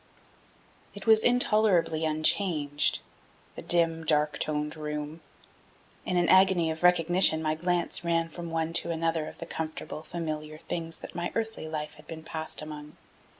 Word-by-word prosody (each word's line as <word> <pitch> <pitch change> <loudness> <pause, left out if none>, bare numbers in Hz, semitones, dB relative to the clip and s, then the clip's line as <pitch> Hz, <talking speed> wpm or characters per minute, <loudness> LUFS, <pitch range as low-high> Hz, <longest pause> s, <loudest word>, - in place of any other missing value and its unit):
It 205 - -9
was 220 -1 +6
intolerably 210 -10 +3
unchanged, 155 -2 +2 0.5
the - - -3
dim, 165 -1 +2
dark 150 -1 +1
toned 150 0 -1
room. 150 +1 -6 0.9
In 180 - 0
an 175 -1 +2
agony 185 -3 +4
of 160 - -7
recognition 175 -1 +4
my 155 -1 0
glance 175 +2 0
ran 165 -1 0
from 170 +1 -8
one 165 0 -2
to - - -8
another 165 -1 -1
of - - -10
the 170 - -7
comfortable, 160 -1 -6
familiar 155 -2 -5
things 165 +1 -5
that - - -11
my 175 0 -3
earthly 225 -7 -3
life 150 -1 -5
had - - -17
been 160 -1 -8
passed 160 -1 -4
among. 150 0 -10
165 Hz, 150 wpm, -28 LUFS, 155-175 Hz, 0.9 s, was